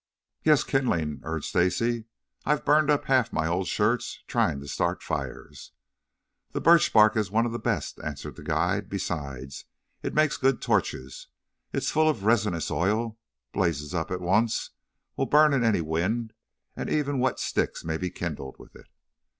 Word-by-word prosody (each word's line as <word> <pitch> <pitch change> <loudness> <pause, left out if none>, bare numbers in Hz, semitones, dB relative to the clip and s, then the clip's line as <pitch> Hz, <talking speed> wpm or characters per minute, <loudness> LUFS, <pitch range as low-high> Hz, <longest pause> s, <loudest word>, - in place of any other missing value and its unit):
"Yes, 155 -3 +5
kindling," 85 - 0
urged 80 -1 -4
Stacy. 110 +6 +1 0.4
"I've 150 +1 0
burned 150 +1 +4
up 145 -1 +2
half 130 -3 +3
of - - -22
my 80 - 0
old 90 +3 0
shirts 110 +4 0
trying 70 - +1
to 70 - -9
start - - -1
fires." - - -6 0.8
"The - - -1
birch 170 -1 +5
bark 110 0 +6
is 105 -3 0
one 115 +3 +2
of 120 - -2
the 120 - -4
best," 105 -11 -2
answered 75 0 -6
the - - -11
guide. 95 +2 0
"Besides, 70 -8 -5 0.4
it - - -4
makes 155 -1 +3
good 135 -1 +2
torches. 65 +1 -1 0.4
It - - -2
is - - 0
full 155 0 +3
of 110 -10 -2
resinous 105 -7 +1
oil, 110 +5 0 0.3
blazes 85 -4 -1
up 85 -2 -2
at 90 0 -3
once, 105 +6 +1 0.5
will 135 - 0
burn 150 0 +5
in 130 -3 +2
any 110 -6 +3
wind, 95 +9 -1 0.4
and - - -4
even 145 -3 0
wet 130 +1 +1
sticks - - -1
may 80 -1 -1
be 90 +2 -3
kindled 75 -7 -5
with - - -16
it." - - -15
105 Hz, 175 wpm, -27 LUFS, 85-125 Hz, 0.8 s, bark